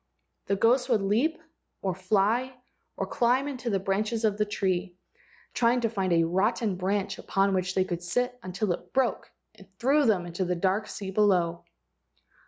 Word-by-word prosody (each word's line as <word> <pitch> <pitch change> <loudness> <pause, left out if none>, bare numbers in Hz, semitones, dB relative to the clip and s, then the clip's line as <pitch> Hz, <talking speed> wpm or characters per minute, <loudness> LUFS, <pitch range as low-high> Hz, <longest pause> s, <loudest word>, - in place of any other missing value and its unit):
The 200 - +1
ghosts 245 +5 +3
would 220 -5 +2
leap 235 +12 +1 0.4
or 190 -2 0
fly 210 +7 +1 0.4
or - - -1
climb 250 +4 +1
into 255 -4 -4
the 200 - +1
branches 210 +4 -1
of 210 -2 +2
this 210 0 0
tree, 185 -3 -1 0.6
trying 240 +1 +2
to 230 -2 0
find 190 -4 -1
a 165 -1 +4
rotten 195 +4 +1
branch 195 +2 -2
upon 195 0 +1
which 185 0 -1
they 185 - +2
could 175 -2 -4
sit 245 +8 -1
until 185 0 -2
it - - -10
broke 260 -2 0 0.2
and 200 -3 -17
threw 275 +6 +3
them 190 -5 +2
into 175 +2 -3
the 180 0 -1
dark 190 +4 0
sea 195 -2 -6
below. 180 -4 +2
200 Hz, 175 wpm, -27 LUFS, 185-235 Hz, 0.6 s, a